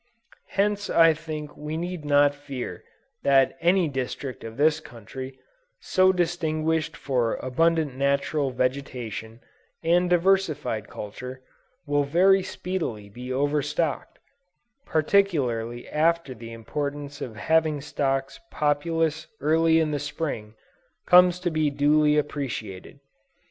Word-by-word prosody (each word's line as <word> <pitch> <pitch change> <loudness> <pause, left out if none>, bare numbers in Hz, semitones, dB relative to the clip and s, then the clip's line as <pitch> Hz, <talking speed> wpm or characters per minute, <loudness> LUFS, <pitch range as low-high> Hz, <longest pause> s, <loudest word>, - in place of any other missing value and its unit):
Hence 205 0 0
I 165 -1 +6
think 155 -1 -7
we 150 +1 -5
need 175 -2 -4
not 145 0 +4
fear 140 -3 -7 0.4
that 135 -1 +4
any 175 +1 +3
district 130 -1 -4
of 115 +1 -8
this 155 +2 +3
country, 130 0 -9 0.4
so 185 0 +3
distinguished 160 -2 -1
for 125 -4 0
abundant 155 +2 +1
natural 140 +1 +1
vegetation 125 -3 -3 0.4
and 175 +2 +3
diversified 170 - +1
culture, 125 +5 -8 0.4
will 145 -1 +1
very 185 +7 +4
speedily 170 - -4
be 125 +5 -8
overstocked, 145 +2 -1 0.7
particularly 140 - +1
after 165 -2 +1
the 115 -1 -10
importance 145 +5 -5
of 115 - -5
having 155 +6 +1
stocks 135 -1 -2
populous 155 +2 0
early 160 +2 +3
in 155 -1 +1
the 145 - -1
Spring, 140 -7 -4 0.5
comes 180 0 +6
to 175 -1 -1
be 155 -1 +1
duly 150 +1 +3
appreciated. 130 -8 -4
145 Hz, 110 wpm, -25 LUFS, 130-165 Hz, 0.7 s, I